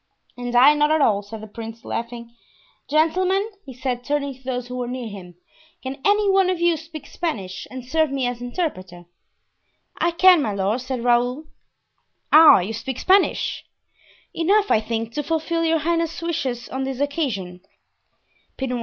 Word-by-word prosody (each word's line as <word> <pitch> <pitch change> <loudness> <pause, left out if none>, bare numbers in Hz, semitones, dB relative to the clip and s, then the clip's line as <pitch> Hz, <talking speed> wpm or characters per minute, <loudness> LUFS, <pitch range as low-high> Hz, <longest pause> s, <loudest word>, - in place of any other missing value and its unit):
"And 245 0 -5
I 265 +5 +7
not 295 0 +2
at 315 0 +3
all," 210 -8 +3
said 210 +2 -9
the 215 - -9
prince, 225 +1 -9
laughing. 235 0 -6 0.5
"Gentlemen," 365 +6 +2 0.2
he 265 - -8
said, 250 -1 -3
turning 285 0 -2
to 260 +1 -21
those 250 -1 -3
who 250 0 -6
were 245 -1 -3
near 250 -1 -5
him 185 -4 -10 0.5
"can 270 +1 -6
any 415 0 +3
one 385 -1 +3
of 365 -2 -1
you 345 -1 +3
speak 315 -2 -10
Spanish 195 - -5
and 255 -1 -8
serve 315 +4 +1
me 270 -2 -1
as 245 -1 -3
interpreter?" 190 - -4 0.9
"I 340 - +2
can, 355 0 +6
my 210 -7 -2
lord," 200 +5 0
said 255 -1 -4
Raoul. 245 +4 +2 0.9
"Ah, 310 - +8
you 200 +5 -4
speak 260 +3 -5
Spanish?" 380 +5 +2 0.7
"Enough, 405 +5 +2
I - - +5
think, 225 +1 -4
to 295 - -1
fulfill 325 +2 -1
your 325 0 +2
highness's 335 +1 -1
wishes 265 -8 -3
on 265 +1 -3
this 265 -1 -4
occasion." 245 - -2
265 Hz, 165 wpm, -22 LUFS, 235-325 Hz, 0.9 s, Ah